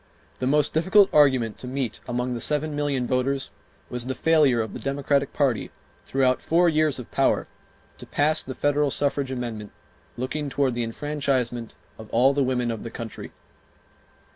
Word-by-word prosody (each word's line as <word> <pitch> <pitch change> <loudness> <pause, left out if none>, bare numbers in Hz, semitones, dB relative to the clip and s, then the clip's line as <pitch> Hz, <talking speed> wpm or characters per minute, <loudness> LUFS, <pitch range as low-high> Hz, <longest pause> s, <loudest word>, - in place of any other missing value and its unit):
The 130 - -1
most 150 +2 +2
difficult 190 +5 +4
argument 130 -7 +3
to 125 - -7
meet 130 -2 -3
among 125 +1 -2
the 120 -1 -3
seven 150 0 -1
million 145 -4 -1
voters 130 +2 -1 0.4
was 125 0 -5
the 130 - -2
failure 150 -7 +3
of 110 -1 -3
the - - -6
Democratic 140 0 0
party, 135 -6 0 0.4
throughout 130 -1 +2
four 175 +2 +3
years 155 -3 +2
of 125 - -9
power, - - +1 0.5
to - - -10
pass 155 +2 +2
the 130 - -7
federal 145 +1 +1
suffrage 140 0 0
amendment 120 -5 -5 0.5
looking 140 +4 -3
toward 135 -2 +1
the 120 0 -1
enfranchisement 125 -2 -2 0.2
of 110 -1 -10
all 130 +4 +4
the 140 0 +1
women 125 -2 0
of 115 - -5
the 115 - -6
country. 115 -1 -8
135 Hz, 165 wpm, -25 LUFS, 125-145 Hz, 0.5 s, difficult